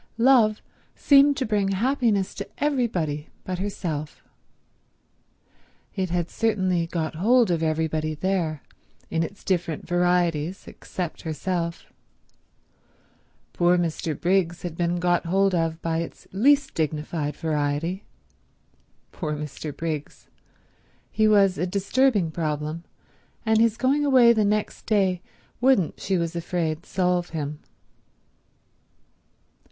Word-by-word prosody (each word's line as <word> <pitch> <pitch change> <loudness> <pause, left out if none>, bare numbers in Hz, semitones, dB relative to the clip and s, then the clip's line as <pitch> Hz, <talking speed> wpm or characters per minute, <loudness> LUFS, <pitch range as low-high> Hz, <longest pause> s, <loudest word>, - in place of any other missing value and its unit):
Love 230 -3 +4 0.3
seemed 280 0 +5
to 265 - -1
bring 210 -2 +1
happiness 215 -1 +1
to 200 - -7
everybody 205 - -1
but 185 -1 -4
herself. 170 -7 -4 1.7
It 190 -2 -1
had 175 -1 -1
certainly 185 -7 0
got 165 -2 -3
hold 225 +6 +3
of 165 -2 0
everybody 155 -1 -1
there, 165 -4 -1 0.5
in 165 - +1
its 195 +5 -5
different 175 -4 -2
varieties, 175 -1 0
except 175 -3 -6
herself. 170 +1 -3 1.6
Poor 175 +1 +3
Mr. 165 -3 -2
Briggs 175 -1 +1
had 175 -3 -5
been 170 0 0
got 175 -1 +1
hold 195 +2 +2
of 165 -1 0
by 165 -1 0
its 170 - -7
least 275 +7 +3
dignified 155 -1 -2
variety. 160 +3 -2 1.1
Poor 155 -4 -4
Mr. 150 0 -6
Briggs. 155 -1 -5 0.8
He 215 0 +3
was 200 -3 +4
a 180 - 0
disturbing 200 -1 +1
problem, 155 0 -3 0.6
and 220 -1 +3
his 225 -1 +3
going 270 +4 +2
away 255 -4 +6
next 210 -1 -1
day 190 -4 +2 0.4
wouldn't 250 - +2
she 190 -1 0
was 170 0 -2
afraid 170 -1 -2
solve 180 -1 0
him. 150 0 -4
180 Hz, 115 wpm, -24 LUFS, 160-210 Hz, 1.7 s, away